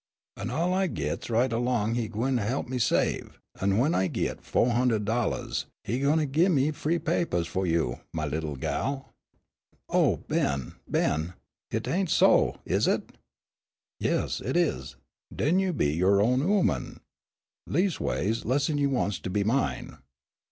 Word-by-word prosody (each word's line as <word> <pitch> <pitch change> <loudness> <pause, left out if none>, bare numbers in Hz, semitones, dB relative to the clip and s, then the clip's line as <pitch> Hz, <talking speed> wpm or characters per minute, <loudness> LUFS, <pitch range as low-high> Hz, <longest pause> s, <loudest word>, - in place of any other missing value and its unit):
"An' 115 - -5
all 165 +8 0
I 190 0 +2
gits - - -3
right 120 +2 +2
along 115 -2 0
he 120 -2 -1
gwine 120 +5 0
he'p 120 +6 -2
me 125 0 -3
save, 115 - 0 0.2
an' 100 +1 +1
when 140 +8 +3
I 95 - +2
git - - -2
fo' - - +1
hund'ed 120 -3 +1
dollahs 115 +1 -1 0.2
he 120 - -2
gwine 145 +1 +2
gin 170 +4 +3
me 140 +3 +2
de - - -10
free 165 +4 0
papahs 165 - 0
fu' 95 +3 -2
you, 80 -8 0
my 80 -1 -2
little 75 0 -3
gal." 135 - -3 0.8
"Oh, - - +3
Ben, 70 -2 -1 0.2
Ben! 80 +3 0 0.3
Hit - - -3
ain' 190 +2 +1
so, - - +4
is - - +1
it?" - - 0 0.9
"Yes, - - 0
hit - - -1
is. 65 +1 0 0.4
Den 170 +6 +2
you'll 190 -2 0
be 75 - +1
you 90 +4 +1
own 125 +5 +3
ooman 180 - 0 0.7
leas'ways 145 - 0
less'n 145 +4 +1
you 140 -1 +2
wants 120 -7 0
to - - -5
be 100 +2 0
mine." 120 - -1
120 Hz, 160 wpm, -27 LUFS, 95-145 Hz, 0.9 s, so